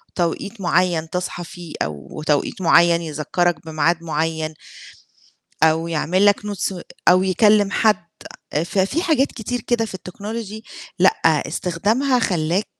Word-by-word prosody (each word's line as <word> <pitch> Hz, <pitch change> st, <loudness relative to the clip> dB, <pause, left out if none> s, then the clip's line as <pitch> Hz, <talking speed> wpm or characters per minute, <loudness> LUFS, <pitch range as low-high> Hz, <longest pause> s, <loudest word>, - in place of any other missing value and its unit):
توقيت 195 Hz, +5 st, -2 dB
معيّن 175 Hz, -3 st, +1 dB
تصحى 180 Hz, 0 st, -4 dB
فيه، 170 Hz, -1 st, -10 dB
أو 75 Hz, -, -7 dB
توقيت 150 Hz, +5 st, 0 dB
معين 170 Hz, 0 st, +5 dB
يذكّرك 160 Hz, +1 st, -1 dB
بميعاد 160 Hz, +2 st, 0 dB
معيّن. 160 Hz, 0 st, -2 dB, 1.1 s
أو 160 Hz, +1 st, +3 dB
يعمل 170 Hz, +5 st, +1 dB
لك 205 Hz, 0 st, +4 dB
Notes 200 Hz, -3 st, -3 dB, 0.3 s
أو 180 Hz, +1 st, +6 dB
يكلم 205 Hz, +2 st, +3 dB
حد، 205 Hz, -5 st, +2 dB, 0.6 s
ففي 195 Hz, -, 0 dB
حاجات 300 Hz, -6 st, +3 dB
كتير 245 Hz, +1 st, -4 dB
كده 235 Hz, 0 st, 0 dB
في 205 Hz, -4 st, -6 dB
الTechnology 210 Hz, +3 st, -7 dB, 0.4 s
لأ، -, -, +5 dB, 0.3 s
استخدامها 220 Hz, +10 st, 0 dB
خلّاك 180 Hz, -2 st, 0 dB
180 Hz, 120 wpm, -21 LUFS, 165-205 Hz, 1.1 s, أو